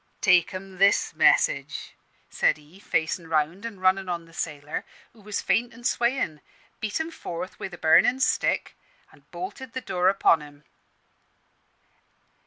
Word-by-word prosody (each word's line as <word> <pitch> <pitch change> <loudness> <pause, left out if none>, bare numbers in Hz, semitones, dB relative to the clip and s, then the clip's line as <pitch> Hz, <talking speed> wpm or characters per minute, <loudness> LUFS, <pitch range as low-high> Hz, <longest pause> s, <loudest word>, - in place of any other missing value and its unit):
'Take 180 -3 +4
'em 190 0 -8
this 200 +1 +4
message,' - - +2 0.4
said - - +2
he, 150 +5 -18
facin' 165 -3 -1
round; 165 +7 0
an', 210 -5 -10
runnin' 185 0 +2
on 170 -1 -3
the 165 - -19
sailor, 150 -2 -4 0.3
who 225 - -19
was 210 0 -4
faint 240 +1 +1
and 240 0 -13
swayin', 235 - 0 0.4
beat 215 +4 -2
him 320 +1 -3
forth 180 - -7
wi' - - -4
the 175 -2 -10
burnin' 170 +11 +4
stick, - - +1 0.4
and - - -23
bolted 265 -10 -7
the 260 - -2
door 180 -5 +1
upon 190 -4 +4
him. 145 0 -13
185 Hz, 150 wpm, -26 LUFS, 165-225 Hz, 0.4 s, Take